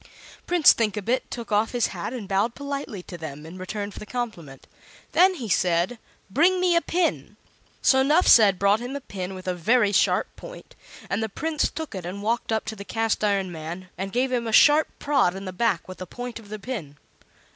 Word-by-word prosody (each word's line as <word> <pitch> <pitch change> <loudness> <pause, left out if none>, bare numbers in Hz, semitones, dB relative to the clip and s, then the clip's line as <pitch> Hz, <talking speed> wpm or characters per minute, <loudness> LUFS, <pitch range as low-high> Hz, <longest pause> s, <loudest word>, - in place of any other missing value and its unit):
Prince 350 -3 +6
Thinkabit 220 +2 -1
took 235 -2 -7
off 210 +3 +1
his 240 -2 +2
hat 180 +4 -4
and 240 -6 -6
bowed 200 +5 0
politely 280 -9 -5
to 175 -2 -9
them 150 -1 -7
in 175 +3 -10
return 205 +2 -5
for - - -10
the - - -8
compliment. 200 - -6 0.5
Then 370 +4 +5
he 245 -9 -6
said: 180 +4 +1 0.3
"Bring 340 - +3
me 360 -1 +3
a 335 - +4
pin." 345 0 -1 0.5
So 265 -1 +5
Nuphsed 265 - +6
brought 200 +3 +3
him 245 +3 -6
a - - -3
pin 190 -7 -6
with 185 0 -10
a 185 - +1
very 205 +5 +2
sharp 205 - +2
point, - - -11 0.3
and 200 - -1
the 220 - -2
Prince 310 +8 -1
took 320 -5 -6
it 190 -2 -5
and 190 +4 -6
walked 230 +1 -1
up 220 0 0
to 220 - -5
the 200 - -8
Cast 225 +1 -1
iron 200 -3 +1
Man, 170 +3 -7
and 195 +1 -5
gave 255 +3 0
him 240 -2 -1
a - - -2
sharp 295 +7 +6
prod 275 -11 +1
in 195 +1 -7
the 185 - -5
back 200 -4 0
with 185 - -9
the 185 - -6
point 245 +3 -7
of 210 -3 -15
the 215 - -5
pin. 200 - -6
215 Hz, 210 wpm, -25 LUFS, 185-255 Hz, 0.5 s, Prince